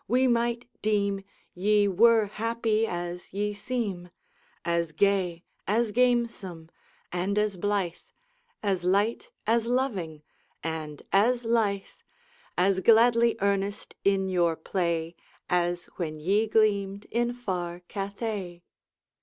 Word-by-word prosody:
we 250 +4 +3
might 235 -1 +1
deem 200 -2 +1 0.3
Ye 205 +2 +3
were 220 +3 +5
happy 225 +1 0
as 175 -1 -5
ye 205 +1 -1
seem 205 -5 -3 0.6
As 170 -1 0
gay, 185 -3 +1 0.2
as 220 +2 +2
gamesome, 230 -9 0 0.4
and 185 +3 -1
as 210 -1 +1
blithe, 195 -2 0 0.7
As 190 -3 0
light, 200 +5 +1 0.2
as 230 +1 +2
loving, 200 - -1 0.4
and 155 -2 -5
as 235 +5 +3
lithe, 215 -4 +1 0.7
As 190 +1 +3
gladly 230 +3 +5
earnest 200 0 -1
in 195 -1 +2
your 175 -3 +2
play, 170 -1 -2 0.4
As 175 0 +1
when 155 -3 -3
ye 200 +8 +2
gleamed 205 -2 +1
in 240 +1 +1
far 180 -8 -4
Cathay. 195 -2 -5
200 Hz, 110 wpm, -27 LUFS, 175-225 Hz, 0.7 s, were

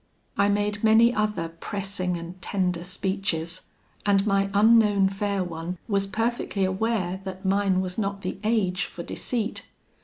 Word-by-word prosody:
"I 200 0 +3
made 205 +1 0
many 225 +2 +6
other 210 -6 0
pressing 185 +1 -3
and 170 +2 -9
tender 180 -3 -1
speeches; 185 -2 -2 0.4
and 200 -1 +3
my 195 -1 +2
unknown 205 -1 +5
fair 195 0 -1
one 170 +1 -5
was 200 -3 +1
perfectly 225 -2 -1
aware 190 -1 -1
that 190 0 -7
mine 195 -1 +2
was 185 +2 -4
not 200 -1 -2
the 185 - -4
age 210 -5 +1
for 170 - -8
deceit. 230 +2 -3
195 Hz, 145 wpm, -26 LUFS, 185-210 Hz, 0.4 s, many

